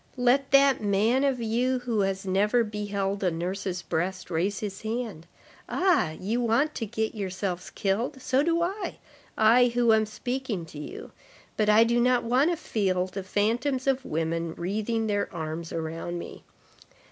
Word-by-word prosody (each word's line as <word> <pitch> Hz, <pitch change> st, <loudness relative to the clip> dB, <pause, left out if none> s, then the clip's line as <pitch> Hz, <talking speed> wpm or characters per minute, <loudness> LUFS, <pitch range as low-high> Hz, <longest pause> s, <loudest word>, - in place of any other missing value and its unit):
Let 255 Hz, +2 st, +3 dB
that 275 Hz, -1 st, +5 dB
man 215 Hz, +6 st, +2 dB
of 270 Hz, -3 st, +1 dB
you 240 Hz, +3 st, +1 dB
who 245 Hz, -3 st, -2 dB
has 195 Hz, -1 st, -1 dB
never 210 Hz, +5 st, +2 dB
beheld 205 Hz, -2 st, -3 dB
a 185 Hz, -, +3 dB
nurse's 180 Hz, +2 st, -3 dB
breast 180 Hz, +3 st, -3 dB
raise 185 Hz, +5 st, 0 dB
his 200 Hz, -2 st, -5 dB
hand. 220 Hz, -7 st, -4 dB, 0.4 s
Ah! 335 Hz, -, +2 dB
you 225 Hz, +6 st, -1 dB
want 240 Hz, +7 st, +2 dB
to 225 Hz, -, -4 dB
get 220 Hz, +1 st, -2 dB
yourselves 190 Hz, -3 st, -4 dB
killed, 230 Hz, +8 st, -1 dB
so 260 Hz, +1 st, +1 dB
do 335 Hz, +2 st, +2 dB
I—I, 250 Hz, -, +1 dB
who 240 Hz, -2 st, +4 dB
am 220 Hz, -1 st, +3 dB
speaking 235 Hz, -4 st, -3 dB
to 155 Hz, -2 st, -10 dB
you; 150 Hz, -, -8 dB, 0.4 s
but 215 Hz, -1 st, +1 dB
I 215 Hz, +2 st, +7 dB
do 235 Hz, +1 st, +2 dB
not 250 Hz, 0 st, +3 dB
want 255 Hz, +7 st, +3 dB
to 345 Hz, -, 0 dB
feel 190 Hz, -9 st, 0 dB
the 190 Hz, +1 st, -6 dB
phantoms 235 Hz, +8 st, 0 dB
of 270 Hz, -1 st, +1 dB
women 165 Hz, -1 st, -2 dB
wreathing 215 Hz, +5 st, -1 dB
their 205 Hz, -1 st, -1 dB
arms 160 Hz, 0 st, -5 dB
around 165 Hz, +2 st, -4 dB
me. 170 Hz, -, -9 dB
215 Hz, 160 wpm, -27 LUFS, 185-245 Hz, 0.4 s, I